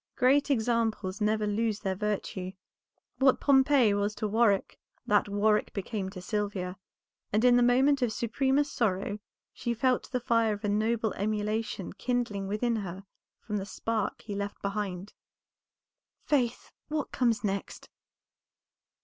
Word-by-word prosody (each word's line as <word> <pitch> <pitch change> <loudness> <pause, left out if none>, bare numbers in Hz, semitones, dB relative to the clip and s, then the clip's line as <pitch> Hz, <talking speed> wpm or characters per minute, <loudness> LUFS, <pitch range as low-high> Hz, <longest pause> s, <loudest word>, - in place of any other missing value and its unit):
Great 275 +4 +3
examples 225 -5 0
never 215 0 +1
lose 215 0 -1
their 190 - -1
virtue; 195 -2 -3 0.7
what 265 -1 +4
Pompey 265 -5 +4
was 205 +1 0
to 215 - -2
Warwick 210 -2 +2 0.3
that 205 0 +2
Warwick 210 +1 +2
became 200 -1 -3
to 190 -2 -9
Sylvia, 200 -2 -2 0.6
and 215 +4 +2
in 245 -1 +7
the 245 - +5
moment 260 +3 +4
of 245 -3 +1
supremest 270 +6 0
sorrow 205 -2 0 0.3
she 235 -1 -2
felt 255 +2 +1
the 250 - 0
fire 230 -2 +2
of 205 +1 -7
a - - +1
noble 220 +1 +1
emulation 210 -1 -2
kindling 230 -3 -2
within 225 +3 0
her 190 -2 -6 0.4
from 210 - -3
the 195 - -3
spark 220 -1 -2
he 210 - -6
left 200 0 -4
behind. 200 -1 -3 1.1
"Faith, 250 -5 0 0.2
what 305 -1 -3
comes 235 -4 +1
next?" 200 -1 -3
215 Hz, 140 wpm, -29 LUFS, 205-240 Hz, 1.1 s, in